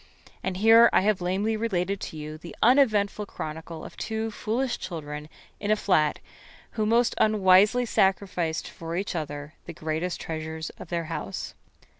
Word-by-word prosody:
And 190 Hz, -1 st, -3 dB
here 225 Hz, +3 st, +7 dB
I -, -, +4 dB
have 205 Hz, -1 st, +1 dB
lamely 195 Hz, +5 st, 0 dB
related 200 Hz, -3 st, -1 dB
to 160 Hz, -, -6 dB
you 155 Hz, 0 st, -6 dB
the 170 Hz, -, -10 dB
uneventful 215 Hz, -5 st, +3 dB
chronicle 160 Hz, 0 st, -7 dB
of -, -, -10 dB
two 220 Hz, 0 st, -3 dB
foolish 235 Hz, +4 st, -2 dB
children 150 Hz, -3 st, -6 dB, 0.3 s
in 205 Hz, -, -3 dB
a 215 Hz, -, +5 dB
flat 155 Hz, -8 st, +2 dB, 0.5 s
who 215 Hz, -2 st, -1 dB
most 235 Hz, +1 st, +3 dB
unwisely 210 Hz, +3 st, +5 dB
sacrificed 190 Hz, -6 st, 0 dB
for 165 Hz, 0 st, -6 dB
each 195 Hz, +3 st, -2 dB
other 145 Hz, -1 st, -5 dB
the 170 Hz, -, -7 dB
greatest 160 Hz, +3 st, -3 dB
treasures 160 Hz, 0 st, -5 dB
of -, -, -8 dB
their 170 Hz, -1 st, -1 dB
house. -, -, -5 dB
185 Hz, 155 wpm, -26 LUFS, 160-215 Hz, 0.5 s, here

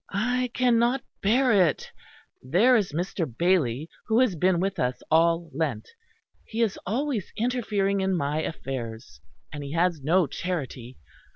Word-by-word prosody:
"I 245 Hz, +5 st, 0 dB
cannot 245 Hz, +1 st, +2 dB, 0.2 s
bear 245 Hz, +5 st, +3 dB
it; 180 Hz, -8 st, +2 dB, 0.5 s
there 190 Hz, -, +4 dB
is 205 Hz, -8 st, +1 dB
Mr. 170 Hz, -1 st, -2 dB
Bailey 160 Hz, -6 st, +1 dB, 0.2 s
who 225 Hz, -1 st, +2 dB
has 240 Hz, -8 st, +2 dB
been 180 Hz, +2 st, +2 dB
with 195 Hz, +2 st, -2 dB
us 125 Hz, 0 st, -1 dB
all 165 Hz, 0 st, +3 dB
Lent; 140 Hz, -7 st, -2 dB, 0.5 s
he 230 Hz, +1 st, -1 dB
is 215 Hz, -4 st, -1 dB
always 245 Hz, -1 st, -2 dB
interfering 210 Hz, -5 st, 0 dB
in 190 Hz, 0 st, +1 dB
my 150 Hz, +1 st, -1 dB
affairs. 115 Hz, -, -6 dB, 0.3 s
And 145 Hz, -1 st, -6 dB
he 140 Hz, +1 st, -6 dB
has 170 Hz, -2 st, +1 dB
no 170 Hz, +6 st, +3 dB
charity. 135 Hz, -6 st, -5 dB
180 Hz, 145 wpm, -26 LUFS, 150-220 Hz, 0.5 s, there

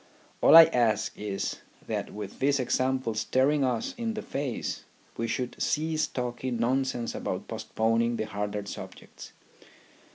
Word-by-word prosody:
All -, -, +7 dB
I 165 Hz, -, +13 dB
ask 115 Hz, -9 st, +1 dB
is 100 Hz, -2 st, -3 dB, 0.3 s
that -, -, -3 dB
with 105 Hz, -2 st, -8 dB
this 140 Hz, +1 st, +2 dB
example 130 Hz, -1 st, 0 dB
staring 130 Hz, +6 st, +2 dB
us 230 Hz, -, -1 dB
in 225 Hz, -1 st, -2 dB
the 215 Hz, -, -4 dB
face 135 Hz, -4 st, -3 dB, 0.3 s
we 115 Hz, -, -2 dB
should 125 Hz, +1 st, -3 dB
cease 155 Hz, 0 st, 0 dB
talking 125 Hz, 0 st, -3 dB
nonsense 125 Hz, 0 st, 0 dB
about 95 Hz, -, -4 dB
postponing 115 Hz, +1 st, 0 dB
the 110 Hz, -, -1 dB
harder 105 Hz, 0 st, -4 dB
subjects. -, -, -9 dB
125 Hz, 135 wpm, -28 LUFS, 110-135 Hz, 0.3 s, I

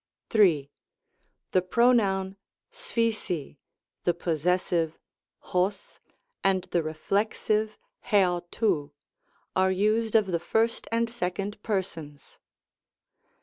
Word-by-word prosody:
3. 165 Hz, -, +4 dB, 0.8 s
The 185 Hz, -, +4 dB
pronoun 195 Hz, -2 st, +2 dB, 0.4 s
acplocy 225 Hz, -, -2 dB, 0.5 s
the 175 Hz, -, +2 dB
possessive 170 Hz, 0 st, 0 dB, 0.5 s
oq, 185 Hz, +2 st, -2 dB, 0.4 s
and 190 Hz, -2 st, +2 dB
the 175 Hz, -, +2 dB
reflexive 210 Hz, +6 st, -1 dB, 0.3 s
iavrov^ 180 Hz, -5 st, +1 dB, 0.6 s
are 190 Hz, 0 st, +3 dB
used 215 Hz, +4 st, +1 dB
of 215 Hz, -2 st, +6 dB
the 175 Hz, -3 st, -1 dB
first 225 Hz, +7 st, 0 dB
and 230 Hz, 0 st, +2 dB
second 205 Hz, -2 st, -3 dB
per 200 Hz, -4 st, 0 dB
sons. 150 Hz, -5 st, -12 dB
190 Hz, 90 wpm, -27 LUFS, 175-215 Hz, 0.8 s, of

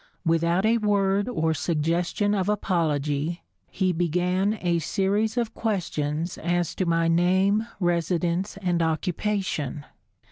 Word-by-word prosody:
Without 170 Hz, +3 st, +2 dB
a 230 Hz, +1 st, +3 dB
word 200 Hz, 0 st, +1 dB
or 160 Hz, -7 st, 0 dB
suggestion 170 Hz, +6 st, 0 dB
of 195 Hz, -1 st, 0 dB
apology, 160 Hz, -5 st, -1 dB, 0.3 s
he 185 Hz, -2 st, 0 dB
began 180 Hz, +5 st, 0 dB
a 170 Hz, -1 st, +1 dB
series 205 Hz, +6 st, 0 dB
of 235 Hz, -2 st, -1 dB
questions 170 Hz, -6 st, -2 dB
as 175 Hz, 0 st, 0 dB
to 185 Hz, -, -2 dB
my 165 Hz, 0 st, +2 dB
name, 190 Hz, +6 st, +2 dB
residence 175 Hz, +1 st, 0 dB
and 175 Hz, -2 st, +1 dB
occupation. 165 Hz, -3 st, -1 dB
175 Hz, 115 wpm, -25 LUFS, 165-200 Hz, 0.3 s, a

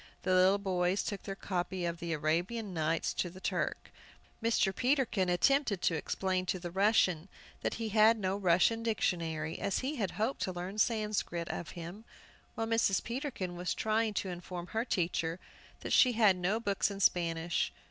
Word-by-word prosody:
The 185 Hz, -, +1 dB
little 185 Hz, +2 st, +5 dB
boys 185 Hz, -1 st, 0 dB
took 200 Hz, -, -4 dB
their 195 Hz, -, -5 dB
copy 185 Hz, -2 st, -3 dB
of 170 Hz, 0 st, -3 dB
the 170 Hz, 0 st, -4 dB
"Arabian 175 Hz, +8 st, -1 dB
Nights" 160 Hz, 0 st, 0 dB
to 175 Hz, -, -1 dB
the 185 Hz, +2 st, -12 dB
Turk. -, -, -2 dB, 0.5 s
Mr. 220 Hz, -4 st, +2 dB
Peterkin 250 Hz, -8 st, +1 dB
attempted 230 Hz, +3 st, +2 dB
to -, -, +3 dB
explain 185 Hz, +3 st, -1 dB
to 185 Hz, -, 0 dB
the 175 Hz, -1 st, -6 dB
Russian 190 Hz, -3 st, +2 dB, 0.3 s
that -, -, -1 dB
he 225 Hz, -1 st, -3 dB
had 220 Hz, +2 st, +5 dB
no 190 Hz, -2 st, -1 dB
Russian 190 Hz, +4 st, +3 dB
dictionary, 165 Hz, -8 st, -1 dB
as 195 Hz, -, -1 dB
he 290 Hz, +2 st, -2 dB
had 200 Hz, -5 st, 0 dB
hoped 225 Hz, +6 st, -1 dB
to 185 Hz, -, -1 dB
learn 185 Hz, +3 st, -5 dB
Sanscrit 210 Hz, -7 st, 0 dB
of 170 Hz, -, -4 dB
him, 175 Hz, +6 st, -7 dB, 0.5 s
while 225 Hz, -, -1 dB
Mrs. 225 Hz, -4 st, +2 dB
Peterkin 235 Hz, -, -4 dB
was 180 Hz, +1 st, -2 dB
trying 220 Hz, 0 st, 0 dB
to 190 Hz, -, -1 dB
inform 175 Hz, 0 st, -6 dB
her 225 Hz, +2 st, -1 dB
teacher 170 Hz, -4 st, -1 dB, 0.4 s
that -, -, -3 dB
she 250 Hz, -2 st, +6 dB
had 215 Hz, -4 st, +5 dB
no 180 Hz, +5 st, 0 dB
books 200 Hz, -3 st, 0 dB
in 200 Hz, -1 st, -6 dB
Spanish. 170 Hz, -2 st, +1 dB
190 Hz, 175 wpm, -32 LUFS, 175-220 Hz, 0.5 s, she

